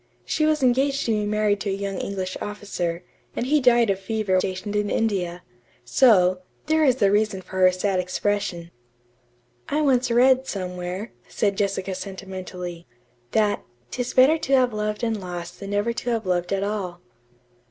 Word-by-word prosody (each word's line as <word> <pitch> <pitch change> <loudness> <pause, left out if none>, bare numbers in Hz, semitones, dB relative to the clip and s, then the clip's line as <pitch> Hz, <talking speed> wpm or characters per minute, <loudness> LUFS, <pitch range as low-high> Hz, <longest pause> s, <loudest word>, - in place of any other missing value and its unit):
She 310 - +1
was 305 -2 +1
engaged 270 +2 +2
to 230 - +1
be 210 -1 0
married 210 -1 +1
to 205 - -2
a - - 0
young 195 -1 -3
English 190 -2 -4
officer, 185 -4 -4 0.3
and - - -1
he 295 +3 +3
died 240 -4 +4
of 190 - -2
fever 205 0 -2
while 185 - +4
stationed 190 +2 -4
in 210 0 0
India. 180 -5 -1 0.4
So, 185 - +4 0.2
there 315 +1 +2
is 260 -3 +3
reason 200 -1 +2
for 185 - -6
her 185 0 +6
sad 185 +1 0
expression." 180 -2 -2 1.0
"I 300 +2 +1
once 260 -4 +2
read, 260 +2 +4
somewhere," 180 +2 -4 0.2
said 200 -1 0
Jessica 195 -1 -1
sentimentally, 185 -2 -7 0.5
"that 210 -2 +2 0.3
''Tis 245 -1 -3
better 275 +5 +6
to 275 - -2
have 255 -3 +4
loved 210 +1 -3
and 225 -3 -1
lost 175 -1 -7
than 200 - -7
never 205 +3 0
to 240 - -4
have 225 -3 -1
loved 180 -1 0
at 195 0 0
all.'" 200 -4 -3
205 Hz, 170 wpm, -24 LUFS, 185-235 Hz, 1.0 s, her